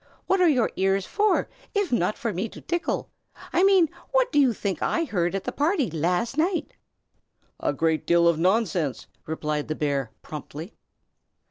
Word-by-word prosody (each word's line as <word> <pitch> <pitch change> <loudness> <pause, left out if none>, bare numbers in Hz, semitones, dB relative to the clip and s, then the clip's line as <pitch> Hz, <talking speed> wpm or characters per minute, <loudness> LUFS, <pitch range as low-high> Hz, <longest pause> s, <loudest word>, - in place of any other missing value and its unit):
What 385 -1 +2
are 355 - +6
your 255 -7 +2
ears 195 0 +2
for, 425 0 +1 0.3
if 405 -7 +1
not 210 -3 +1
for 230 -3 -2
me 195 +6 -2
to - - -11
tickle? 345 0 -2 0.4
I - - +3
mean, 385 -4 +6 0.2
what - - +2
do 295 - +3
you 265 -3 +5
think 200 -3 -3
I 335 - +1
heard 185 - -1
at 195 - -2
the - - -3
party, 295 - +1
last 180 - 0
night?" 335 -1 0 0.9
"A - - 0
great 160 +2 0
deal 170 0 +5
of 170 -2 +3
nonsense!" 180 - +1 0.2
replied 150 -1 -2
the 155 - -2
bear, 140 -5 -1
promptly. 155 +4 -8
195 Hz, 170 wpm, -25 LUFS, -, 0.9 s, are